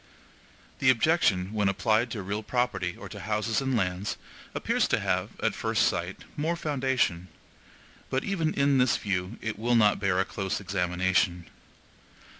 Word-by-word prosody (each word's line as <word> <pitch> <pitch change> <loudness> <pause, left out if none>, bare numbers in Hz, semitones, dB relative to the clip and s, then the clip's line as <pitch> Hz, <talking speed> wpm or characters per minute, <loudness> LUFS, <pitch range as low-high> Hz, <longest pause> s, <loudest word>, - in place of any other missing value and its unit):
The 130 - +4
objection, 115 - +3
when 105 -2 +2
applied 110 +4 +1
to 110 -4 -5
real 100 +3 -3
property 110 -7 -1
or - - -8
to - - -9
houses 110 +3 -1
and 135 -2 0
lands, 90 0 -1 0.4
appears - - +1
to - - +1
have, - - -2
at - - +2
first - - +1
sight, - - -3
more 160 +3 0
foundation, 130 - 0 0.8
but 130 - 0
even 170 -6 0
in 140 -1 +3
this 125 -2 +3
view 95 +1 -2
it 110 -2 -3
will 120 +2 +2
not 105 -3 +4
bear 95 -2 +1
a 95 - +2
close 95 -2 -3
examination. 90 -2 0
105 Hz, 155 wpm, -28 LUFS, 95-130 Hz, 0.8 s, The